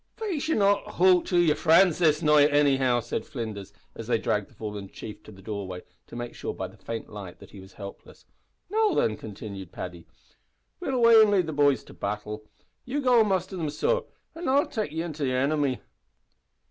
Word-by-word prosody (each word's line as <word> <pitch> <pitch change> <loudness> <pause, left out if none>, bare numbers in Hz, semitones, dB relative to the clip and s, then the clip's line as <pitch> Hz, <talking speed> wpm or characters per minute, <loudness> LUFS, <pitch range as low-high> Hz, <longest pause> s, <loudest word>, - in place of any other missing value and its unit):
"Faix, 365 -10 -3
ye'll - - +2
not 200 -1 +3
`hoot' 180 0 +3
to 180 - 0
yer 170 -3 +5
frinds 165 +3 +4
this 155 -1 +3
night, 150 -1 +5
anyhow," 135 -4 +3
said 115 - -4
Flinders, 110 -9 -6 0.2
as 115 - -8
they 120 - +2
dragged 105 -2 -1
the - - -22
fallen 105 -3 -6
chief 105 - -9
to - - -14
the 95 -1 -15
doorway, 95 -4 -5 0.2
to - - -11
make 120 0 -5
sure, - - -5
by - - -4
the - - -16
faint 115 -1 -6
light, 100 -4 -9
that - - -15
he 100 - -11
was 95 0 -14
helpless. 100 -1 -11 0.5
"Now, 430 -3 +2
thin," 110 - +2
continued 100 -4 -8
Paddy, 90 -2 -8 0.7
"we'll 265 - -2
away 230 -2 +7
an' 215 - +5
lead 195 -4 +3
the 160 - -4
boys 145 -2 +3
to - - -14
battle. 105 +1 -4 0.4
You 270 +4 -3
go 250 -4 +4
an' 220 - +4
muster 190 -1 -1
them, 165 -4 -2
sor, 485 - 0 0.3
an' 330 +2 -6
I'll 280 +4 +3
take 220 -9 -3
ye 160 +1 -3
to 155 -2 -5
the 130 -2 0
inimy." 140 0 0
145 Hz, 205 wpm, -26 LUFS, -, 0.7 s, away